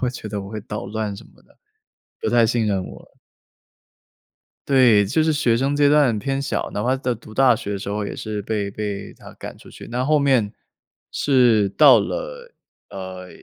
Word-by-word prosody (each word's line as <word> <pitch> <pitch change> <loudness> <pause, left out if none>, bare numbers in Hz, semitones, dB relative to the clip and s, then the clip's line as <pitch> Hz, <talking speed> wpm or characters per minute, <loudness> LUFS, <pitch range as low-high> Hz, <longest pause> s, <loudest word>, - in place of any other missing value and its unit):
会 125 - 0
觉 120 -4 -8
得 105 -1 -4
我 95 - -8
会 110 0 -6
捣 105 0 -6
乱 105 -1 -4
什 - - -12
么 - - -24
的， - - -28 0.6
不 - - -1
太 120 -1 +4
信 115 -1 0
任 95 -2 -1
我。 - - -14 1.5
对， 125 -6 +5
就 155 +10 +1
是 160 - +2
学 125 -6 +2
生 135 +3 0
阶 145 0 +4
段 140 -7 +3
偏 135 +3 -2
小， 135 - -2
哪 105 - -2
怕 125 +4 +1
在 130 -2 -2
读 110 -1 -14
大 125 -1 +4
学 100 - -5
的 100 - -3
时 100 - -7
候 105 0 -2
也 - - -5
是 105 -2 -5
被 100 -1 -3
被 100 -1 -5
她 - - -14
赶 - - -10
出 - - -16
去。 - - -12
那 125 +2 -1
后 150 +1 +3
面 130 -7 +2 0.6
是 120 -8 +3
到 - - +7
了， - - -5 0.4
呃， 95 -1 -8
115 Hz, 215 characters per minute, -21 LUFS, 105-135 Hz, 1.5 s, 到